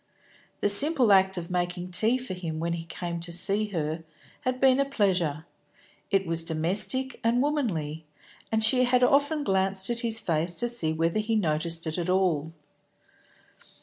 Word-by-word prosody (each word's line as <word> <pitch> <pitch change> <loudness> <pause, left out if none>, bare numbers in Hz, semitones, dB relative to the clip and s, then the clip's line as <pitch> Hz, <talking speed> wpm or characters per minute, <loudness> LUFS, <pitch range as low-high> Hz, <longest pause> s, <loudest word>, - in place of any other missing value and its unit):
The - - +2
simple 255 0 +7
act 190 0 +3
of 170 0 -7
making 180 0 -3
tea 220 +7 +2
for 255 -6 -7
him 165 -4 -6
when 170 +1 -2
he 165 -1 -6
came 170 0 -6
to 170 +1 -7
see 200 +5 +2
her 160 -4 -4 0.4
had 255 -2 -3
been 265 0 +3
a - - +3
pleasure; 180 - -1 0.6
it 195 -1 0
was 165 -1 -2
domestic 190 +11 0
and 230 +2 +1
womanly, 170 - -3 0.4
and 220 0 0
she 255 +3 +4
had 250 0 +2
often 285 +3 +2
glanced 190 0 0
at 235 - -3
his 230 -2 +1
face 170 -2 -2
to 240 - -1
see 235 -10 +1
whether 165 +5 -1
he 220 +1 -2
noticed 165 -3 -1
it 160 +2 -3
at 175 +1 -4
all. 175 -5 0
190 Hz, 170 wpm, -26 LUFS, 165-235 Hz, 0.6 s, simple